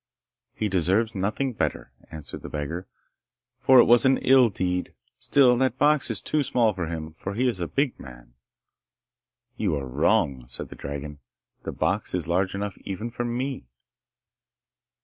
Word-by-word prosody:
'He 110 - -1
deserves 95 +4 +1
nothing 110 +7 -1
better,' - - -3 0.2
answered 75 -2 -8
the - - -8
beggar, 80 +5 -5 0.7
'for 130 0 +5
it - - +9
was 120 0 +5
an 130 0 +4
ill 130 -2 +5
deed. 90 -2 -2 0.2
Still 130 -3 +4
that 130 -1 +1
box 145 0 +3
is 110 -4 -1
too 155 - 0
small 120 -5 +2
for 90 -4 -4
him, 80 -1 -6
for 95 +5 -6
he 125 +3 +1
is 115 -7 -1
a 85 - -2
big 140 - -1
man.' - - -13 1.2
'You 95 -7 0
are 70 -2 -3
wrong,' 65 0 +1
said 65 - -5
the - - -10
dragon. 70 +1 -7 0.4
'The - - -6
box - - -1
is - - -2
large 95 +3 0
enough 100 0 -4
even 100 +4 -5
for 120 +1 -3
me. 125 - -3
100 Hz, 165 wpm, -25 LUFS, 80-125 Hz, 1.2 s, it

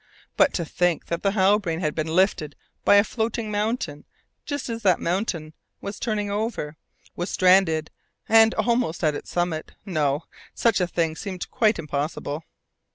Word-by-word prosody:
But - - +5
to 170 - -1
think 175 +1 0
that 170 0 -2
the 195 -1 +1
Halbrane 190 -4 +2
had 155 -3 0
been 155 0 -2
lifted 160 -3 +1 0.3
by - - +6
a 200 - +7
floating 220 -1 -2
mountain 205 -8 -2 0.4
just 285 -2 -3
as 230 -1 -4
that 185 -5 +3
mountain 170 -4 -2 0.3
was 200 +1 -6
turning 210 -3 -1
over, 205 -8 -2 0.4
was 175 - -3
stranded 180 -4 +3 0.4
and 225 0 +6
almost 235 -9 0
at 155 -1 +3
its - - -7
summit 175 -3 -2
no! 150 -5 0 0.3
such 225 -5 +2
a 180 - +2
thing 165 -2 -1
seemed 185 0 -6
quite 220 -1 +3
impossible. 150 0 -3
180 Hz, 160 wpm, -24 LUFS, 160-215 Hz, 0.4 s, a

